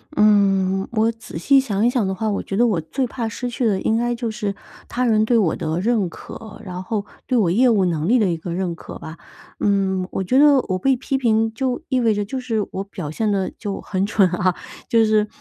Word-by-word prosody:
嗯， 195 Hz, -3 st, +3 dB
我 225 Hz, +1 st, +2 dB
仔 225 Hz, -7 st, -10 dB
细 275 Hz, -, +4 dB
想 220 Hz, -5 st, 0 dB
一 -, -, +5 dB
想 245 Hz, -5 st, 0 dB
的 190 Hz, -, -2 dB
话， 220 Hz, +3 st, -1 dB
我 200 Hz, -, -1 dB
觉 195 Hz, -, -5 dB
得 240 Hz, -, +4 dB
我 210 Hz, -8 st, +1 dB
最 255 Hz, -, -2 dB
怕 235 Hz, -1 st, -4 dB
失 245 Hz, +2 st, -4 dB
去 240 Hz, +1 st, -2 dB
的 200 Hz, -4 st, +1 dB
应 220 Hz, -, +1 dB
该 240 Hz, +1 st, 0 dB
就 235 Hz, -2 st, -3 dB
是 210 Hz, -3 st, -3 dB, 0.3 s
他 250 Hz, -, -2 dB
人 220 Hz, -2 st, +3 dB
对 235 Hz, +1 st, +3 dB
我 185 Hz, -7 st, +2 dB
的 160 Hz, -1 st, -2 dB
认 220 Hz, -3 st, +1 dB
可， 220 Hz, +6 st, -10 dB
然 180 Hz, -2 st, -6 dB
后 205 Hz, +1 st, -3 dB, 0.2 s
对 255 Hz, -, +1 dB
我 185 Hz, -7 st, +3 dB
业 245 Hz, +7 st, +4 dB
务 210 Hz, -5 st, +3 dB
能 165 Hz, -3 st, -1 dB
力 245 Hz, +5 st, +4 dB
的 210 Hz, -5 st, +2 dB
一 165 Hz, -, -2 dB
个 170 Hz, +1 st, -6 dB
认 180 Hz, -1 st, -2 dB
可 -, -, -9 dB
吧。 160 Hz, +1 st, -9 dB, 0.4 s
嗯， 190 Hz, -2 st, +1 dB
我 190 Hz, -, -2 dB
觉 255 Hz, +8 st, +2 dB
得 290 Hz, -1 st, +7 dB
我 185 Hz, 0 st, 0 dB
被 270 Hz, +6 st, +3 dB
批 270 Hz, +2 st, -2 dB
评 225 Hz, -3 st, +1 dB
就 260 Hz, +3 st, -2 dB
意 260 Hz, -2 st, +2 dB
味 230 Hz, -2 st, +3 dB
着 205 Hz, 0 st, -1 dB
就 260 Hz, +6 st, -4 dB
是 225 Hz, -5 st, -1 dB
我 190 Hz, -, -3 dB
表 180 Hz, -7 st, -6 dB
现 215 Hz, +6 st, -1 dB
得 195 Hz, -2 st, 0 dB
就 205 Hz, -3 st, -4 dB
很 190 Hz, 0 st, -1 dB
蠢 200 Hz, -3 st, +3 dB
啊， 180 Hz, +1 st, 0 dB, 0.3 s
就 230 Hz, -1 st, +4 dB
是， 215 Hz, -1 st, +2 dB
215 Hz, 260 characters per minute, -21 LUFS, 190-235 Hz, 0.4 s, 得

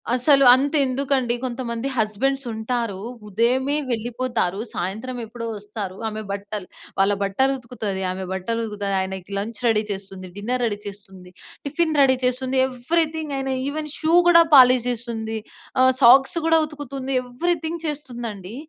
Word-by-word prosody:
అసలు 275 Hz, +2 st, +5 dB
అంతెందుకండి, 270 Hz, -2 st, +1 dB
కొంతమంది 240 Hz, 0 st, -3 dB
హస్బెండ్సుంటారు. 230 Hz, -1 st, -1 dB, 0.3 s
ఉదయమే 250 Hz, +7 st, +1 dB, 0.2 s
వెళ్ళిపోతారు, 235 Hz, -4 st, -1 dB
సాయంత్రమెప్పుడో 230 Hz, +4 st, -5 dB
వస్తారు. 205 Hz, -2 st, -6 dB
ఆమె 215 Hz, 0 st, -5 dB
బట్టలు 200 Hz, -1 st, -5 dB, 0.3 s
వాళ్ళ 195 Hz, +1 st, +4 dB
బట్టలుతుకుతది, 235 Hz, -2 st, -1 dB
ఆమె 190 Hz, +1 st, -5 dB
బట్టలుతుకుతది, 210 Hz, 0 st, -3 dB
ఆయనకి 190 Hz, 0 st, -5 dB
లంచ్ 210 Hz, +1 st, -4 dB
రెడీ 220 Hz, -1 st, +3 dB
చేస్తుంది, 195 Hz, -1 st, -6 dB
డిన్నర్ 245 Hz, +4 st, -2 dB
రెడీ 210 Hz, -3 st, -1 dB
చేస్తుంది, 190 Hz, -2 st, -11 dB, 0.3 s
టిఫిన్ 315 Hz, +3 st, 0 dB
రెడీ 265 Hz, -1 st, +5 dB
చేస్తుంది. 255 Hz, +1 st, 0 dB
ఎవ్రీథింగ్ 310 Hz, +4 st, -1 dB
ఆయనా 270 Hz, 0 st, -2 dB
ఈవెన్ 300 Hz, +1 st, -4 dB
షూ 320 Hz, +1 st, 0 dB
గూడా 335 Hz, -1 st, +8 dB
పాలిష్ 255 Hz, -2 st, +7 dB
జేస్తుంది. 225 Hz, -2 st, -4 dB, 0.4 s
ఆహ్, 260 Hz, 0 st, +6 dB
సాక్స్ 270 Hz, +6 st, +6 dB
గూడా 325 Hz, 0 st, +5 dB
ఉతుకుతుంది. 275 Hz, -3 st, -6 dB
ఎవ్రీథింగ్ 330 Hz, +5 st, -2 dB
చేస్తుందండీ. 240 Hz, -9 st, -5 dB
240 Hz, 120 wpm, -22 LUFS, 210-270 Hz, 0.4 s, గూడా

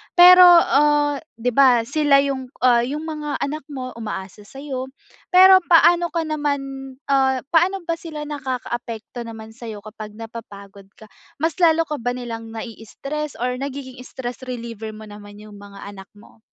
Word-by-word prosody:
Pero, 360 Hz, +1 st, +9 dB
ah, 295 Hz, -4 st, +4 dB, 0.2 s
'di 245 Hz, +2 st, -2 dB
ba 250 Hz, -2 st, +4 dB
sila 280 Hz, +1 st, +3 dB
yung, 265 Hz, -2 st, -3 dB, 0.2 s
ah, 245 Hz, -2 st, +5 dB
yung 300 Hz, +3 st, -4 dB
mga 300 Hz, -2 st, -5 dB
anak 300 Hz, 0 st, -5 dB
mo 260 Hz, -3 st, -6 dB
umaasa 205 Hz, -1 st, -7 dB
sa'yo, 270 Hz, 0 st, -6 dB, 0.4 s
pero 375 Hz, +1 st, +7 dB
paano 345 Hz, 0 st, +5 dB
ka 335 Hz, -1 st, -2 dB
naman 275 Hz, -3 st, -4 dB, 0.2 s
ah, 265 Hz, -2 st, +2 dB
paano 355 Hz, +3 st, +2 dB
ba 335 Hz, 0 st, -3 dB
sila 310 Hz, -3 st, -7 dB
nakakaapekto 245 Hz, -4 st, -6 dB
naman 220 Hz, -1 st, -10 dB
sa'yo 220 Hz, -3 st, -9 dB
kapag 215 Hz, -1 st, -10 dB
napapagod 200 Hz, -3 st, -11 dB
ka, -, -, -16 dB, 0.3 s
mas 325 Hz, +3 st, -2 dB
lalo 330 Hz, -1 st, +4 dB
ka 300 Hz, -3 st, -5 dB
ba 245 Hz, +1 st, -2 dB
nilang 230 Hz, -2 st, -7 dB
nai-stress 270 Hz, +6 st, -6 dB
or 250 Hz, 0 st, -2 dB
nagiging 270 Hz, -2 st, -7 dB
stress 245 Hz, -2 st, -7 dB
reliever 230 Hz, -3 st, -7 dB
mo 215 Hz, -, -11 dB
naman 205 Hz, -1 st, -12 dB
yung 210 Hz, -1 st, -13 dB
mga 200 Hz, -1 st, -12 dB
anak 200 Hz, -1 st, -10 dB
mo? 210 Hz, +2 st, -19 dB
260 Hz, 155 wpm, -21 LUFS, 225-300 Hz, 0.4 s, Pero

